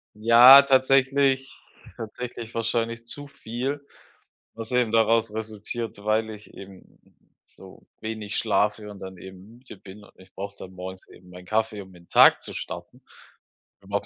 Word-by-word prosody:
Ja, 120 Hz, +5 st, +8 dB
tatsächlich 135 Hz, 0 st, +2 dB, 0.4 s
tatsächlich 115 Hz, +1 st, -8 dB
wahrscheinlich 115 Hz, 0 st, -2 dB
zu 145 Hz, +4 st, -9 dB
viel, 135 Hz, +3 st, -5 dB, 0.7 s
was 115 Hz, +1 st, -9 dB
eben 125 Hz, -3 st, +1 dB
daraus 115 Hz, -1 st, +2 dB
resultiert, 110 Hz, 0 st, -6 dB
weil 110 Hz, +1 st, 0 dB
ich 105 Hz, -1 st, -13 dB
eben 95 Hz, -1 st, -14 dB, 0.5 s
so -, -, -17 dB, 0.2 s
wenig 110 Hz, -2 st, -5 dB
schlafe 105 Hz, -1 st, 0 dB
und 100 Hz, -1 st, -11 dB
dann 95 Hz, -1 st, -9 dB
eben 95 Hz, +5 st, -13 dB
müde 125 Hz, -4 st, -14 dB
bin, 100 Hz, +2 st, -14 dB
und -, -, -18 dB
ich 95 Hz, -, -19 dB
brauche 100 Hz, +1 st, -7 dB
dann 95 Hz, -, -11 dB
morgens 95 Hz, 0 st, -9 dB
eben 90 Hz, 0 st, -18 dB
meinen 90 Hz, 0 st, -13 dB
Kaffee, 110 Hz, +1 st, -1 dB
um 95 Hz, -1 st, -14 dB
in 85 Hz, -, -17 dB
'n -, -, -43 dB
Tag -, -, +6 dB
zu -, -, -7 dB
starten, -, -, -8 dB, 0.8 s
um 100 Hz, +1 st, -15 dB
auch 100 Hz, -, -1 dB
110 Hz, 160 wpm, -24 LUFS, 100-120 Hz, 0.8 s, Ja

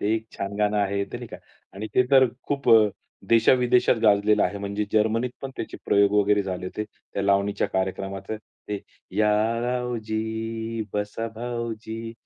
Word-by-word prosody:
ते 105 Hz, +2 st, +1 dB
एक 110 Hz, 0 st, -3 dB
छान 100 Hz, +1 st, -4 dB
गाणं 105 Hz, 0 st, +2 dB
आहे, 100 Hz, 0 st, +1 dB
ते -, -, -7 dB
नाही -, -, -7 dB
का -, -, -8 dB, 0.4 s
आणि 105 Hz, +3 st, -5 dB
ते 125 Hz, -, +6 dB
तर 130 Hz, -2 st, +7 dB, 0.2 s
खूप 140 Hz, -1 st, -1 dB
अ, 110 Hz, -2 st, +7 dB, 0.4 s
देशा 115 Hz, +1 st, +5 dB
विदेशात 125 Hz, -1 st, +3 dB
गाजलेलं 105 Hz, 0 st, +4 dB
आहे. 100 Hz, -, 0 dB
म्हणजे 100 Hz, +1 st, -2 dB
जर्मनीत 110 Hz, +3 st, +2 dB
पण 135 Hz, -, -4 dB
त्याचे -, -, -5 dB
प्रयोग 100 Hz, 0 st, +4 dB
वगैरे 105 Hz, 0 st, +3 dB
झाले 90 Hz, -1 st, -4 dB
होते. 105 Hz, +3 st, -4 dB
त्या 100 Hz, -1 st, -7 dB
लावणीच्या 100 Hz, +1 st, +2 dB
कार्यक्रमात 95 Hz, +1 st, -3 dB, 0.4 s
ते, 105 Hz, -1 st, -2 dB, 0.4 s
या 105 Hz, 0 st, +4 dB, 0.3 s
रावजी 115 Hz, -2 st, -2 dB
बसा 105 Hz, +2 st, -2 dB
भाऊजी, 115 Hz, -1 st, -5 dB
110 Hz, 160 wpm, -25 LUFS, 100-115 Hz, 0.4 s, तर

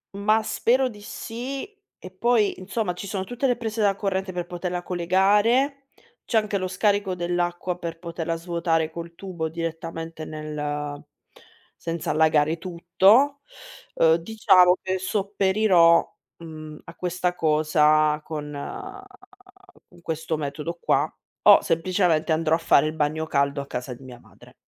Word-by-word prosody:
Ma 215 Hz, +2 st, +2 dB
spero 255 Hz, +4 st, +1 dB
di 210 Hz, -3 st, -12 dB
sì, 245 Hz, +6 st, -6 dB, 0.3 s
e 185 Hz, -, -11 dB
poi 215 Hz, +1 st, +1 dB
insomma, 200 Hz, +1 st, -2 dB
ci 180 Hz, +3 st, -8 dB
sono 195 Hz, -2 st, -3 dB
tutte 245 Hz, +6 st, -2 dB
le 245 Hz, -, +2 dB
prese 225 Hz, -1 st, -5 dB
da 200 Hz, -1 st, +3 dB
corrente 190 Hz, -1 st, -2 dB
per 175 Hz, -1 st, -3 dB
poterla 175 Hz, 0 st, -4 dB
collegare. 205 Hz, +11 st, +2 dB, 0.4 s
C'è 230 Hz, -, +1 dB
anche 215 Hz, -2 st, +1 dB
lo 185 Hz, -1 st, -2 dB
scarico 200 Hz, 0 st, 0 dB
dell'acqua 175 Hz, 0 st, -2 dB
per 165 Hz, -1 st, -5 dB
poterla 165 Hz, -1 st, -4 dB
svuotare 165 Hz, -1 st, -1 dB
col 170 Hz, +1 st, -8 dB
tubo 175 Hz, -4 st, -4 dB
direttamente 165 Hz, 0 st, -5 dB
nel 150 Hz, -1 st, -5 dB, 0.8 s
senza 165 Hz, -1 st, -4 dB
allagare 155 Hz, 0 st, +3 dB
tutto. 190 Hz, -, +3 dB, 0.6 s
Uhm, 160 Hz, 0 st, +5 dB
diciamo 185 Hz, -1 st, +4 dB
che 190 Hz, 0 st, -2 dB
sopperirò, 190 Hz, -3 st, +3 dB, 0.2 s
mhmm, 155 Hz, -2 st, -10 dB
a -, -, -12 dB
questa 180 Hz, 0 st, -2 dB
cosa 155 Hz, -1 st, +3 dB
con 150 Hz, -1 st, -6 dB, 1.4 s
con 175 Hz, -, -19 dB
questo 160 Hz, 0 st, -3 dB
metodo 150 Hz, +4 st, -5 dB
qua, -, -, +1 dB, 0.3 s
o -, -, +8 dB
semplicemente 165 Hz, -1 st, +1 dB
andrò 160 Hz, 0 st, +2 dB
a -, -, +2 dB
fare 160 Hz, -3 st, +4 dB
il 155 Hz, -, -3 dB
bagno 155 Hz, +1 st, -1 dB
caldo 140 Hz, -2 st, 0 dB
a 140 Hz, -, -6 dB
casa 125 Hz, -1 st, -5 dB
di 125 Hz, +2 st, -11 dB
mia 125 Hz, -2 st, -11 dB
madre. -, -, -19 dB
175 Hz, 140 wpm, -24 LUFS, 160-195 Hz, 1.4 s, o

